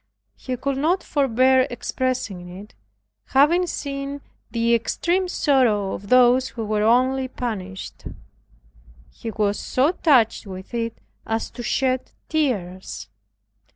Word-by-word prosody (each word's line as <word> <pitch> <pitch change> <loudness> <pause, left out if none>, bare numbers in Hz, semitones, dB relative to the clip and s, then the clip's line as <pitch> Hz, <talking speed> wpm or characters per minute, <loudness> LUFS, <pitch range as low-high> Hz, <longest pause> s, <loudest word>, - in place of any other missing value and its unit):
He 255 -1 -5
could 270 +1 -2
not 345 +6 +1
forbear 260 -1 +3
expressing 245 -7 -3
it, 205 +2 -12 0.5
having 330 +7 +4
seen 280 -2 -4 0.3
the 230 +1 +1
extreme 345 - +1
sorrow 245 - +2
of 200 - -7
those 255 +1 +5
who 230 -4 -5
were 210 0 0
only 255 +4 +3
banished. 200 -7 -6 1.1
He 225 - -7
was 210 -2 0
so 270 +5 +2
touched 260 - +3
with 190 +3 -9
it 230 -1 -2 0.3
as 225 0 -2
to 245 - -8
shed 255 +1 0 0.2
tears. 190 - -2
250 Hz, 120 wpm, -23 LUFS, 215-275 Hz, 1.1 s, those